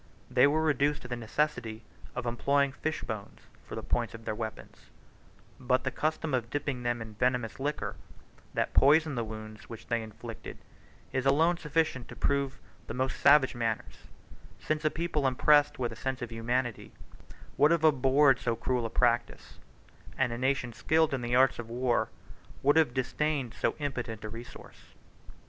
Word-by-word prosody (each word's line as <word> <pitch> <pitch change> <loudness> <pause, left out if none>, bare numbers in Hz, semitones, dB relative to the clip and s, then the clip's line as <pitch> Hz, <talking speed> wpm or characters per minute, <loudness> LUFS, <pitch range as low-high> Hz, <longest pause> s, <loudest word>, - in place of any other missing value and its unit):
They - - +6
were 155 +2 +1
reduced 145 -1 +1
to - - -7
the 125 - -3
necessity 115 -2 -2 0.3
of - - -3
employing 140 +4 +1
fish 155 +3 -3
bones 110 -3 -6 0.3
for - - -6
the - - -5
points 115 -3 -1
of 115 0 -12
their - - -1
weapons; 110 0 -7 0.7
but 130 0 +1
the 130 - -1
custom 155 +1 -1
of 120 -2 0
dipping 140 -2 -2
them 120 -1 -1
in 110 - -10
a - - -13
venomous 125 +2 0
liquor, 145 +2 -2 0.6
that - - 0
poisoned 155 +1 +5
the 120 - -1
wounds 110 0 -9
which 115 - -9
they 115 -1 0
inflicted, 110 +1 -9 0.6
is 130 0 0
alone 165 +5 +4
sufficient 150 -6 -1
to - - -10
prove 140 -1 0 0.3
the - - -5
most 130 +1 -1
savage 140 -1 +6
manners, 115 -3 -3 0.5
since 155 0 -2
a 155 - +3
people 160 -4 -1
impressed 145 +3 +4
with 120 -2 -2
a - - -7
sense 130 -1 -3
of 120 - -6
humanity 120 +1 -2 0.6
would 145 +2 +5
have 165 -1 +2
abhorred 135 -2 +5
so 115 -1 0
cruel 120 +1 -1
a - - -9
practice, 120 0 0 0.6
and 130 -3 +1
a - - -4
nation 130 -2 0
skilled 160 +5 +2
in 130 - -1
the 120 0 0
arts 130 -1 +4
of 115 -1 -6
war 120 +1 0 0.5
would 145 +2 +5
have 155 -6 +3
disdained 135 -1 -1
so - - -1
impotent 125 -7 -4
a - - -4
resource. 115 +3 -12
130 Hz, 175 wpm, -30 LUFS, 115-145 Hz, 0.7 s, They